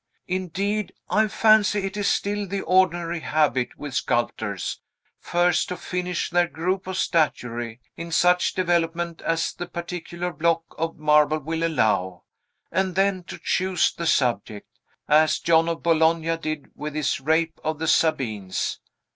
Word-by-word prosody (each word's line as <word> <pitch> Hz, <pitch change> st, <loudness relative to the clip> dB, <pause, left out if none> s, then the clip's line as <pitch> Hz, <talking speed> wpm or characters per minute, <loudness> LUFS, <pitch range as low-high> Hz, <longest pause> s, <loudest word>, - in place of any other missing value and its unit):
Indeed, 190 Hz, +2 st, -2 dB, 0.2 s
I 215 Hz, +3 st, +3 dB
fancy 215 Hz, -1 st, +4 dB
it 195 Hz, +1 st, -4 dB
is 205 Hz, -1 st, -1 dB
still 205 Hz, 0 st, 0 dB
the 195 Hz, +1 st, -3 dB
ordinary 175 Hz, -2 st, +2 dB
habit 150 Hz, -6 st, 0 dB
with 145 Hz, -3 st, -7 dB
sculptors, 110 Hz, -6 st, -1 dB, 0.4 s
first 175 Hz, 0 st, +1 dB
to 180 Hz, -, -4 dB
finish 180 Hz, 0 st, -3 dB
their 175 Hz, 0 st, +3 dB
group 185 Hz, +3 st, -2 dB
of 190 Hz, 0 st, -3 dB
statuary, 120 Hz, -, -1 dB, 0.2 s
in 170 Hz, 0 st, -7 dB
such 180 Hz, +2 st, +3 dB
development 170 Hz, -2 st, 0 dB
as 165 Hz, 0 st, -1 dB
the 175 Hz, -, -6 dB
particular 175 Hz, 0 st, -5 dB
block 165 Hz, +2 st, +1 dB
of 165 Hz, +1 st, -3 dB
marble 150 Hz, 0 st, +4 dB
will 160 Hz, +2 st, -3 dB
allow, 105 Hz, -, 0 dB, 0.5 s
and 185 Hz, +1 st, 0 dB
then 195 Hz, -1 st, +1 dB
to -, -, -8 dB
choose 185 Hz, -1 st, +1 dB
the 170 Hz, -, -4 dB
subject; 115 Hz, -7 st, -1 dB, 0.3 s
as 155 Hz, +1 st, +4 dB
John 165 Hz, 0 st, +3 dB
of 165 Hz, -, -4 dB
Bologna 165 Hz, 0 st, +2 dB
did 155 Hz, -3 st, -5 dB
with 150 Hz, 0 st, -6 dB
his 155 Hz, -3 st, 0 dB
Rape 160 Hz, +3 st, +1 dB
of 155 Hz, 0 st, -1 dB
the 160 Hz, +1 st, -3 dB
Sabines. 110 Hz, -, 0 dB
165 Hz, 145 wpm, -24 LUFS, 155-180 Hz, 0.5 s, fancy